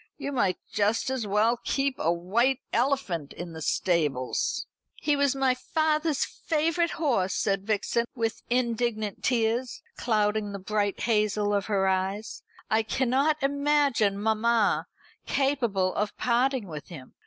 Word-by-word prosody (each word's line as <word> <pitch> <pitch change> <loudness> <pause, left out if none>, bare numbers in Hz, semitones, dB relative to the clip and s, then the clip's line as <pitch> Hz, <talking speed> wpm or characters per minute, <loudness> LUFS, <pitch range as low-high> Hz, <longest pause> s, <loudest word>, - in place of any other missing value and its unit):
You 280 - -4
might 200 -9 +1
just 215 +5 0
as 250 -5 -2
well 220 +4 +2
keep 275 -1 0
a 165 - +2
white 230 +10 +1
elephant 235 - 0
in 175 -1 -7
the 160 - -8
stables." 150 -7 0 0.3
"He 295 - +1
was 280 -1 +2
my 265 -1 +2
father's 310 +2 0
favourite 330 +2 0
horse," 240 - +1
said 195 0 0
Vixen, 220 +2 0
with 225 -2 -2
indignant 235 -4 -1
tears 240 0 0
clouding 210 -2 0
the - - -3
bright 205 +1 -1
hazel 210 -2 +1
of 200 -1 0
her 195 -3 +1
eyes; 190 +3 -1 0.3
"I 220 +1 +2
cannot 270 +6 +1
imagine 280 -7 +2
mamma 220 +1 +2 0.4
capable 235 -10 +1
of 210 +1 -2
parting 250 0 +1
with 150 -3 -8
him. 140 -8 -11
225 Hz, 135 wpm, -27 LUFS, 200-265 Hz, 0.4 s, well